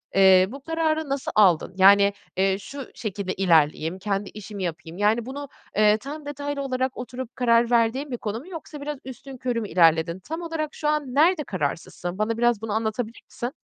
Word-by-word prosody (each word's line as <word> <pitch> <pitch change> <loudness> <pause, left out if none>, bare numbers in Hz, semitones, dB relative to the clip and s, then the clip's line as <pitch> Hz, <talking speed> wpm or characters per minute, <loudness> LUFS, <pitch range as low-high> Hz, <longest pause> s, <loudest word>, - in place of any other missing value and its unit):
eee, 190 -1 +7
bu 275 +2 -8
kararı 315 0 -1
nasıl 275 -1 -2
aldın? 185 -4 +4
Yani, 200 +1 +6 0.2
eee, 190 0 +2
"Şu 275 +6 -8
şekilde 200 -3 -4
ilerleyeyim, 165 -1 +2
kendi 200 0 -2
işimi 210 -1 -7
yapayım." 170 -1 -5
yani, 215 +3 +2
bunu, 280 +3 -6 0.3
eee, 210 0 +5
tam 285 +6 -8
detaylı 285 0 -4
olarak 260 -1 -2
oturup 250 0 -7
karar 235 -1 +3
verdiğin 240 +5 +2
bir 245 - -2
konu 220 0 -4
mu 290 - -13
yoksa 310 -4 -8
biraz 295 0 -4
üstünkörü 255 -2 -4
mü 210 - -5
ilerledin? 170 0 +3
Tam 320 - -6
olarak 325 -3 -3
şu 300 - -3
an 295 -4 -1
nerede 320 +2 +4
kararsızsın? 175 - -4
Bana 220 +2 -1
biraz 240 -2 +2
bunu 225 -2 -3
anlatabilir 220 +1 -2
misin? 240 +1 -4
230 Hz, 180 wpm, -24 LUFS, 195-280 Hz, 0.3 s, eee